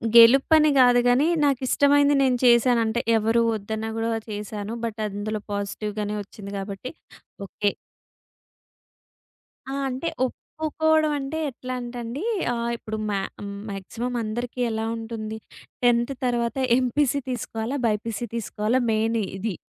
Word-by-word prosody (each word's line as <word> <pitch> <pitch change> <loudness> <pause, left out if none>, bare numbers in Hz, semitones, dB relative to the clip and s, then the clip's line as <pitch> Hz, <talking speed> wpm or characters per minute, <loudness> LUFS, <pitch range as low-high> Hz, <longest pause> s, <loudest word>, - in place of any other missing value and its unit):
గెలుపని 275 +7 +7
గాదు 245 -1 +6
గానీ 250 +4 +4 0.2
నాకిష్టమైంది 285 +2 +3
నేను 260 -2 +3
చేశానంటే 235 -1 +4 0.2
ఎవరూ 225 +2 +2
వద్దన్నా 220 +1 -4
గూడా 225 0 0
వా 225 - -1
చేశాను. 210 +1 -5
బట్ 225 -1 -5
అందులో 210 +1 -4
పాజిటివ్‌గానే 205 +1 -3
ఒచ్చింది 200 0 -10
గాబట్టి 195 +5 -6 0.5
ఓకే. 205 +1 -1 2.0
ఆ! 270 - -4 0.2
అంటే 260 +6 -3 0.2
ఒప్పుకోపోవడం 315 +3 0
అంటే 275 +3 -4
ఎట్లంటే 250 -1 -6
అండి 240 +9 -5 0.3
ఆహ్, 235 0 -2
ఇప్పుడు 220 -1 -5
మా 200 -1 0 0.5
మాక్సిమం 225 +5 -4
అందరికీ 240 +3 -4
ఎలా 220 0 -2
ఉంటుంది? 220 -1 -5 0.5
10థ్ 240 +2 +3
తర్వాత 240 0 0 0.2
ఎంపీసీ 265 +2 +1
తీసుకోవాలా? 240 +1 -3
బైపీసీ 220 +1 -2
తీసుకోవాలా? 225 +1 0
మెయిన్ 220 +1 +1 0.2
ఇది. 200 0 -3
235 Hz, 115 wpm, -24 LUFS, 215-255 Hz, 2.0 s, గెలుపని